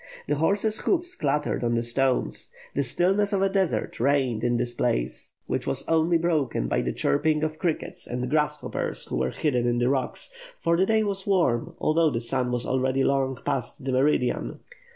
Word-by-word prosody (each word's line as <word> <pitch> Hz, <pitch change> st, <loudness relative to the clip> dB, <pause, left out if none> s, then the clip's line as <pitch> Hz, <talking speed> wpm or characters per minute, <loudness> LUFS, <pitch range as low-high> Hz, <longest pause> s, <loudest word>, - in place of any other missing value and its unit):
The -, -, +1 dB
horses' 200 Hz, +7 st, +2 dB
hoofs 355 Hz, 0 st, 0 dB
clattered 150 Hz, -, -1 dB
on 120 Hz, 0 st, +1 dB
the 115 Hz, -, 0 dB
stones; 130 Hz, +2 st, 0 dB, 0.2 s
the 140 Hz, -, +1 dB
stillness 195 Hz, +10 st, +1 dB
of 195 Hz, -1 st, +2 dB
a 195 Hz, -, +3 dB
desert 190 Hz, -, -1 dB
reigned 130 Hz, -3 st, +1 dB
in 120 Hz, 0 st, +2 dB
this 120 Hz, 0 st, -2 dB
place, -, -, -1 dB
which -, -, -2 dB
was -, -, -1 dB
only 165 Hz, +1 st, +3 dB
broken 155 Hz, -, 0 dB
by -, -, +1 dB
the -, -, -1 dB
chirping 155 Hz, -, +1 dB
of 155 Hz, 0 st, -2 dB
crickets 170 Hz, -4 st, -2 dB
and 125 Hz, +1 st, -3 dB
grasshoppers 150 Hz, +1 st, -1 dB
who -, -, -3 dB
were 65 Hz, -, +1 dB
hidden 125 Hz, -, 0 dB
in 120 Hz, 0 st, +1 dB
the 120 Hz, +1 st, +2 dB
rocks, 135 Hz, -, -2 dB, 0.3 s
for 170 Hz, -, +2 dB
the 190 Hz, +3 st, +2 dB
day 220 Hz, -1 st, +3 dB
was 200 Hz, -2 st, -3 dB
warm 165 Hz, -12 st, +1 dB
although 160 Hz, +1 st, +3 dB
the 115 Hz, -, -2 dB
sun 125 Hz, +1 st, -1 dB
was 125 Hz, -1 st, -2 dB
already 130 Hz, +1 st, +1 dB
long 135 Hz, -1 st, +1 dB
past 130 Hz, +2 st, -3 dB
the 135 Hz, -, 0 dB
meridian. 130 Hz, -1 st, +1 dB
140 Hz, 190 wpm, -26 LUFS, 125-170 Hz, 0.3 s, a